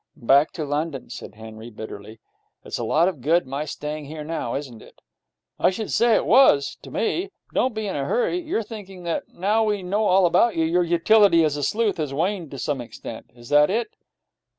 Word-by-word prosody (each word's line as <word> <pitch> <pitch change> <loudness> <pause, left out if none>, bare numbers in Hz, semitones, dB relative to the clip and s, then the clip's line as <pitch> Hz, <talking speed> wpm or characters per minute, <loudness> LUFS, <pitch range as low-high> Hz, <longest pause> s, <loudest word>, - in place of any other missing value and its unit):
'Back 140 +3 +4
to 155 - -4
London,' 145 -1 -3
said 105 - -9
Henry, 110 +1 -10
bitterly. 110 -1 -9 0.5
'It's - - -5
a - - -2
lot 165 +3 +3
of 170 -9 -3
good 165 +5 +2
my 140 +3 -4
staying 150 0 -5
here 155 +1 -7
now, 155 -6 -3
isn't 130 -5 -6
it?' - - -17 0.6
'I - - +4
should 200 +3 -4
say 235 -1 +4
it - - +1
was 220 - +5
to - - -11
me. 400 -3 -1 0.2
Don't 255 -3 +1
be 220 0 -3
in 195 - -3
a 140 -1 -2
hurry. 245 - 0
You're 315 -9 -2
thinking 195 -4 -10
that, 170 -1 -3
now 210 +5 0
we 210 -3 -1
know 205 +4 0
all 190 -1 +4
about 225 +6 +3
you, 160 - +1
your 175 +2 +2
utility 175 +1 +4
as 150 -2 +1
a 145 - -4
sleuth 210 +6 0
has 150 -4 -3
waned 175 +1 -1
to 135 - -8
some 140 -1 -2
extent. 115 -1 -9
Is 120 +1 -14
that 145 0 +5
it?' 220 +2 -1
165 Hz, 210 wpm, -23 LUFS, 140-210 Hz, 0.6 s, was